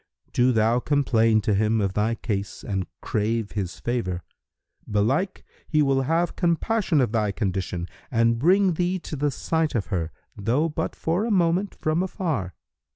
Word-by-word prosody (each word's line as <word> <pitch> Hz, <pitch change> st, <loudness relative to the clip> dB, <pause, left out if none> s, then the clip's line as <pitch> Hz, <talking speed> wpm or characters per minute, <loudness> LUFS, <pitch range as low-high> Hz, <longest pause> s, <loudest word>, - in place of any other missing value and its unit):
Do 125 Hz, +1 st, +4 dB
thou 115 Hz, +1 st, +3 dB
complain 115 Hz, -6 st, +3 dB
to 105 Hz, -, +1 dB
him 110 Hz, +2 st, +2 dB
of 100 Hz, -2 st, 0 dB
thy 110 Hz, +3 st, +1 dB
case 100 Hz, -4 st, -4 dB
and 95 Hz, -2 st, -2 dB
crave 110 Hz, 0 st, -1 dB
his 90 Hz, -7 st, -4 dB
favour: 90 Hz, -, -2 dB, 0.7 s
belike 130 Hz, -, 0 dB, 0.2 s
he 155 Hz, -2 st, +3 dB
will 135 Hz, -1 st, +2 dB
have 165 Hz, +6 st, 0 dB
compassion 175 Hz, 0 st, +1 dB
on 120 Hz, -, +1 dB
thy 110 Hz, -3 st, +1 dB
condition 95 Hz, -4 st, -2 dB, 0.2 s
and 115 Hz, -1 st, +2 dB
bring 185 Hz, +5 st, +4 dB
thee 180 Hz, +3 st, 0 dB
to 165 Hz, -, -6 dB
the 145 Hz, +1 st, +1 dB
sight 160 Hz, +2 st, -1 dB
of 105 Hz, -, 0 dB
her, 85 Hz, -3 st, -1 dB, 0.2 s
though 120 Hz, +10 st, +1 dB
but 150 Hz, -, -3 dB
for 170 Hz, +5 st, 0 dB
a 235 Hz, -, -1 dB
moment 185 Hz, 0 st, +2 dB
from 155 Hz, +2 st, 0 dB
afar. 160 Hz, -, -2 dB
120 Hz, 160 wpm, -25 LUFS, 105-165 Hz, 0.7 s, Do